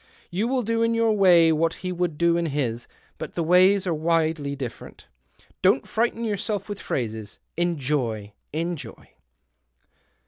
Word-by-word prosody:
" - - -27
You 200 +6 0
will 255 0 0
do 230 +1 0
in 230 0 +2
your 230 -1 +3
way 175 -5 +6
what 165 +1 +1
he 185 - -1
would 175 -3 -2
do 170 +1 +3
in 170 -1 0
his, 125 -6 -2 0.3
but - - -7
the 170 - 0
ways 185 +4 +5
are 175 - 0
widely 160 -2 0
different. 130 -4 -8 0.6
Don't 135 - +3
frighten 230 +1 0
yourself 210 -1 -2
with 205 -1 -6
phrases. 110 -4 -4 0.2
Enjoy! 135 -11 -1 0.2
Enjoy 165 +1 -5
170 Hz, 150 wpm, -24 LUFS, 145-200 Hz, 0.6 s, way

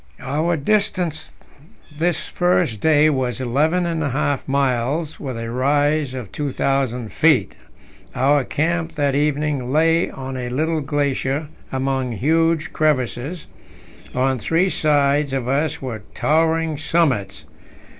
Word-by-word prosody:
Our 155 +5 0
distance 180 -1 0 0.6
this 170 +2 0
first 175 - +1
day 155 -1 +4
was 125 -5 -1
eleven 150 +8 +1
and 165 -2 -1
a 145 - 0
half 140 +1 -1
miles, 140 +3 0
with 130 -4 -5
a 115 0 -5
rise 145 +2 +1
of 125 -6 -7
2,000 135 -5 -1
feet. 150 -10 +3 0.6
Our 140 +2 +3
camp 165 +4 -1
that 145 -3 0
evening 145 -2 0
lay 165 +3 +3
on 130 0 -6
a 125 -1 -4
little 155 +5 0
glacier 145 0 -1 0.2
among 130 -2 -1
huge 160 - +1
crevasses; 145 - -1 0.7
on 130 0 +1
three 165 - +1
sides 145 -3 +2
of 130 -3 -2
us 140 +2 -1
were 115 -5 -5
towering 160 0 +1
summits. 135 - 0
145 Hz, 125 wpm, -21 LUFS, 130-160 Hz, 0.7 s, day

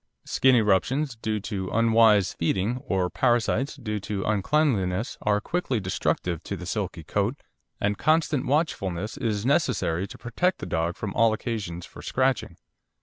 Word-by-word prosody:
Skin 130 -1 +4
eruptions 120 +6 +2
due 110 -1 -2
to 95 -3 -4
unwise 110 -3 +4
feeding, 95 +8 0
or 95 -2 +1
parasites 120 +8 +1
due 110 -6 -4
to 100 -1 -3
uncleanliness, 110 -2 +1
are 105 -1 +2
quickly 135 -3 -1
destructive 90 -3 -1
to - - -5
the - - -8
silky 85 - -3
coat, 100 - 0 0.4
and 100 0 0
constant 155 -3 +2
watchfulness 105 - -1
is 115 -6 -2
necessary 100 - +1
to - - -11
protect 180 +10 0
the - - -6
dog 80 +1 -1
from 100 -2 -5
all 115 -2 +4
occasion 105 -6 -4
for - - -11
scratching. 125 -8 0
110 Hz, 145 wpm, -26 LUFS, 95-130 Hz, 0.4 s, Skin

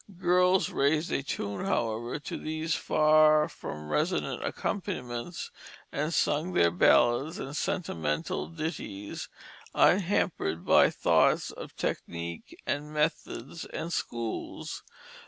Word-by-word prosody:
Girls 180 +1 +3
"raised 150 +4 +1
a - - +1
tune," 100 - -4
however, 120 - -1
to 145 - -6
these 155 +1 -2
far 155 0 +4
from 75 0 -8
resonant 75 0 0
accompaniments, 170 -6 -4 0.4
and 150 +3 -1
sung 165 +2 +1
their 85 - +4
ballads 120 - +4
and 140 -8 -6
sentimental 80 - -2
ditties, 155 - -5 0.5
unhampered 175 - +2
by - - +6
thoughts - - +3
of - - -9
technique 85 0 -4
and 150 +1 -2
methods 155 +2 -2
and 165 +2 -5
schools. 115 -6 -4
150 Hz, 105 wpm, -29 LUFS, 115-165 Hz, 0.5 s, by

